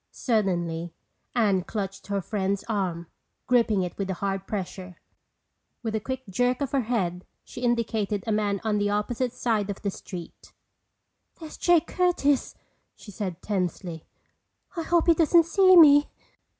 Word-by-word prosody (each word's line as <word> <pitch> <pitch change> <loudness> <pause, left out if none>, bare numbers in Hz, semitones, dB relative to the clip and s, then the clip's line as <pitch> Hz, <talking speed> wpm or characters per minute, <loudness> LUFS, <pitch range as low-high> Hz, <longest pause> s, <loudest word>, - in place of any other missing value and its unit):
Suddenly 175 -7 -1 0.4
Anne 200 -6 +2
clutched 195 -1 -5
her 200 -1 -1
friend's 200 0 -2
arm, 185 -6 -2 0.4
gripping 230 -6 +2
it 180 - -5
with 195 -1 -2
a 190 - -1
hard 195 0 -3
pressure. 185 -2 -6 0.8
With 225 -2 -2
a 220 - 0
quick 260 +4 -5
jerk 245 +6 0
of 280 -2 -2
her 275 - +2
head 190 -7 -2 0.2
she - - -10
indicated 225 -4 0
a 225 - -1
man 205 -2 0
on 215 -2 0
the 205 0 +1
opposite 230 +4 -1
side 225 -5 -1
of 200 - -6
the 200 - -1
street. 180 -2 -10 0.9
"There's 315 -2 -9
Jake 345 -2 +3
Curtis!" 340 -8 +1 0.4
she 205 - -12
said 185 -4 -5
tensely. 180 -4 -3 0.7
"I 335 - -2
hope 340 0 +2
he 335 - +6
doesn't 330 +1 +4
see 370 +2 +5
me!" 290 -3 +7
210 Hz, 150 wpm, -26 LUFS, 190-250 Hz, 0.9 s, me